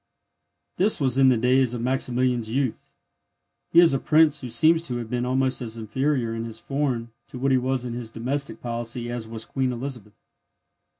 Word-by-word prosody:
This 205 +4 +3
was 135 -2 +1
in 135 - +6
the 130 -2 +4
days 125 +1 +2
of 120 - -4
Maximilian's 125 -2 0
youth. 135 -4 -2 0.8
He 170 - +6
is 170 -4 +6
a 135 - +1
prince 155 0 +3
who 125 - -6
seems 160 +8 +4
to 125 - -3
have 115 -2 -6
been 125 0 -1
almost 130 0 0
as 115 -2 -5
inferior 120 +2 -1
in 115 0 -4
his 115 -1 -8
foreign 130 -5 -2 0.2
to - - -9
what 135 +2 0
he 130 - +4
was 130 0 -1
in 120 - -4
his 120 -2 -6
domestic 130 +5 -3
policy 120 0 -3
as 120 -2 -5
was 110 0 -6
Queen 130 -2 -1
Elizabeth. 120 -4 -7
125 Hz, 190 wpm, -24 LUFS, 115-135 Hz, 0.8 s, in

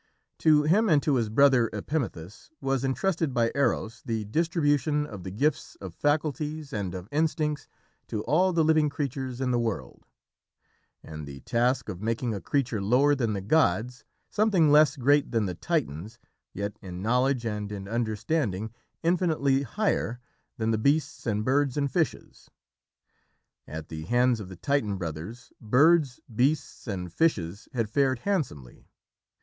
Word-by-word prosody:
To 155 -2 +5
him, 200 +8 +3
and 150 -4 +4
to 150 - +2
his 115 -4 +1
brother 130 -1 +4
Epimethus, 105 - -4
was 135 -1 -1
entrusted 155 +1 0
by 115 -1 +2
Eros 120 -5 0
the 110 -3 -3
distribution 150 - +1
of 105 -9 -9
the 95 - -5
gifts 140 +11 -1
of 95 -4 -9
faculties 150 - -1
and 95 -4 -3
of 90 +1 -7
instincts 150 -1 0 0.4
to 105 - -3
all 185 +5 +3
the 165 -2 +2
living 155 -1 +3
creatures 135 -3 -4
in 130 -1 0
the 120 - +2
world, 110 - -4 1.0
and 75 -2 -8
the 70 -1 -9
task 120 +2 0
of 90 - -6
making 115 +1 -1
a 100 - -5
creature 125 -7 -1
lower 125 +8 +4
than 120 -6 0
the 100 - -3
gods, 125 0 +1 0.2
something 200 -8 +3
less 150 -1 +6
great 145 +2 +3
than 115 -3 +1
the 90 - -3
Titans, 110 - -3 0.3
yet 100 +1 -5
in 90 0 -7
knowledge 125 +2 +1
and 105 -2 -3
in 100 -1 -6
understanding 110 - -1 0.3
infinitely 160 -6 +2
higher 140 - -1 0.4
than 110 0 0
the 110 - 0
beasts 145 +3 0
and 105 -1 0
birds 140 +1 +1
and 140 -2 0
fishes. 165 -4 -3 1.2
At 80 0 -7
the 80 -1 -6
hands 120 +3 +2
of 100 -3 -8
the 95 - -10
Titan 110 -3 0
brothers, 90 +7 -7
birds, 140 +4 +4 0.2
beasts, 135 +3 0
and 90 -5 -4
fishes 100 - 0
had 115 -3 -1
fared 130 +3 +1
handsomely. 120 - -3
125 Hz, 155 wpm, -27 LUFS, 105-150 Hz, 1.2 s, less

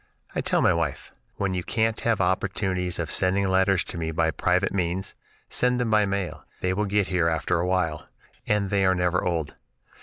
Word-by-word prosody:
I - - -1
tell - - +1
my - - +5
wife: 80 -5 -3 0.2
"When 100 -2 -1
you 90 - -1
can't 110 +2 0
have 115 -3 +1
opportunities 95 -1 0
of 85 -3 -3
sending 95 +1 +2
letters 95 -1 +3
to 85 - -7
me 80 -1 -2
by 80 0 +1
private 90 +4 +1
means, 90 0 -2 0.3
send 125 0 +1
them 120 -2 0
by 105 -1 +4
mail; 95 -2 -3 0.2
they 90 0 0
will 105 +3 0
get 100 -1 +1
here 85 -3 +2
afterwhile, 85 -1 0 0.4
and 105 -2 +1
they 100 -1 +2
are 95 0 +3
never 90 0 +1
old. 85 -4 -1
95 Hz, 185 wpm, -25 LUFS, 85-100 Hz, 0.4 s, my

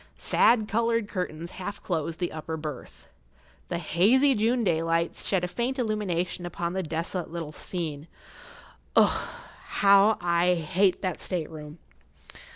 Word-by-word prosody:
Sad 225 -3 +3
coloured 230 0 +1
curtains 175 -4 -4
half 205 +2 -6
closed 165 -2 -2
the 175 - -2
upper 160 +1 -5
berth. 150 -4 -8 0.6
The - - -1
hazy 230 - +3
June 235 +2 +1
daylight 165 -2 +1
shed 190 -3 0
a - - 0
faint 240 +8 -2
illumination 190 -7 -1
upon 175 0 -3
the 190 - -1
desolate 165 +1 -3
little 165 -2 -5
scene. 155 -3 -5 0.9
Ugh! - - +3 0.4
how 200 +2 +5
I 175 +1 +2
hate 180 +5 +1
that 185 -3 -2
state 170 -4 -2
room! 150 0 -9
180 Hz, 135 wpm, -27 LUFS, 165-205 Hz, 0.9 s, how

